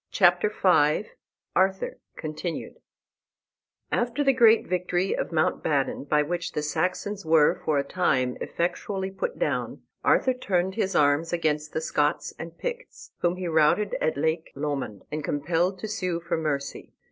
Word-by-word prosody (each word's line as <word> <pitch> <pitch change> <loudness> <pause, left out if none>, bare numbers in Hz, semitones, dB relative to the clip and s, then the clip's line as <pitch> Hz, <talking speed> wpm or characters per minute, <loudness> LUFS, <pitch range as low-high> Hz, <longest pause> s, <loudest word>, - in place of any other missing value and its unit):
CHAPTER 180 +1 +4
V 180 -2 +2 0.4
ARTHUR 190 +1 +1 0.2
(Continued) 155 +2 -5 1.1
After 240 +4 0
the 275 -1 +4
great 230 -3 +5
victory 180 +1 0
of - - -3
Mount 155 -1 +1
Badon, 140 -1 -1
by 150 0 +4
which 175 +3 -3
the 150 - -2
Saxons 185 +6 -2
were 160 -2 +4
for 145 -3 +1
the - - -18
time 130 -9 +1
effectually 190 +2 -2
put 465 - -4
down, - - -2 0.2
Arthur 260 - +3
turned 190 -6 0
his 195 -3 -1
arms 145 +3 +3
against 150 -3 -1
the 160 - -1
Scots 150 -1 0
and 165 +1 -8
Picts, - - -6
whom 175 0 +1
he 180 -1 -4
routed 160 +6 +3
at 155 - 0
Lake 160 +2 0
Lomond, 135 -8 -3
and 155 0 -3
compelled 170 +7 0
to 200 - -5
sue 185 -5 -2
for 170 0 -2
mercy. 145 -4 -3
170 Hz, 150 wpm, -26 LUFS, 150-190 Hz, 1.1 s, great